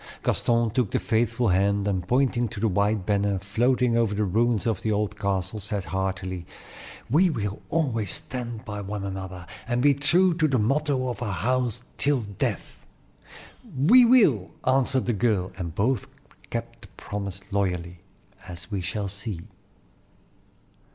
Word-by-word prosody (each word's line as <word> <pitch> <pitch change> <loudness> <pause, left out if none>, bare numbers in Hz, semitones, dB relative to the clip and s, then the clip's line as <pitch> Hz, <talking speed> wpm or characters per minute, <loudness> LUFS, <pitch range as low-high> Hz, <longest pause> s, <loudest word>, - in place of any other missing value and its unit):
Gaston 115 -1 +1
took 125 -3 +1
the - - 0
faithful 115 +1 +1
hand, 100 +2 +2
and 95 -3 -1
pointing 125 -1 +2
to 105 - -7
the 110 - +2
white 100 0 +1
banner 100 -1 +1
floating 120 +5 +1
over 115 -3 +2
the 105 - +1
ruins 110 +3 +1
of 115 -2 0
the 110 - 0
old 105 0 0
castle, 100 +1 -2
said 100 -1 -3
heartily: 95 0 -3 0.6
"We 165 +10 +4
will 105 - -3
always 120 - 0
stand 120 -3 -4
by 105 -1 -5
one 100 0 -5
another, 95 -2 -6 0.2
and 120 0 0
be 140 +3 +5
true 175 +6 +4
to 160 -2 +3
the 135 -3 +1
motto 135 +3 +1
of 120 - -5
our 110 -4 -2
house 125 +3 -1
till 145 -3 +2
death." 100 -3 -4 0.9
"We 215 - +7
will!" 200 - +4 0.2
answered 130 0 +2
the 120 - +1
girl, 105 -4 +1
and 85 -2 -5
both 120 +7 0 0.4
kept 115 0 -5
the - - -11
promise 100 -2 -5
loyally, 90 -3 -1 0.5
as 90 +3 -8
we 100 -2 -1
shall 100 +3 -3
see. 100 -2 -6
110 Hz, 155 wpm, -25 LUFS, 100-125 Hz, 0.9 s, We